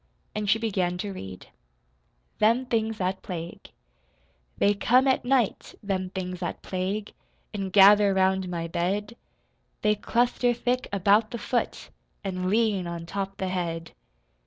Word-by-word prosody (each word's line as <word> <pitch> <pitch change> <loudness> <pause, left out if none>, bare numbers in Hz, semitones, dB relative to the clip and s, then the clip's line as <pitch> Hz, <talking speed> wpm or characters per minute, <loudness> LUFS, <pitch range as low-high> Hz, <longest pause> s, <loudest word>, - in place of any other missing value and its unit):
And 210 -1 -2
she 215 - +5
began 190 -6 -1
to 200 +2 -4
read: 95 - -9 0.9
THEM 230 +4 +3
THINGS 225 -2 -1
THAT 190 0 -2
PLAGUE 170 -2 -7 0.9
They 205 - +4
come 250 +6 +3
at 260 - +2
night, 245 -4 0
them 190 -2 -2
things 185 -1 -5
that 175 - -5
plague, 195 +3 -3 0.4
An' 195 -2 -3
gather 200 +1 +7
round 190 -1 +1
my 170 -1 -3
bed. 200 +7 -2 0.7
They 210 0 +4
cluster 240 +3 +1
thick 250 +2 -1
about 200 +3 +3
the 235 - -5
foot, 240 +2 -2 0.3
An' 185 -2 -2
lean 210 -4 +1
on 170 -1 -5
top 195 +2 -4
the 190 -2 -2
head. 170 -2 -3
195 Hz, 140 wpm, -26 LUFS, 185-220 Hz, 0.9 s, gather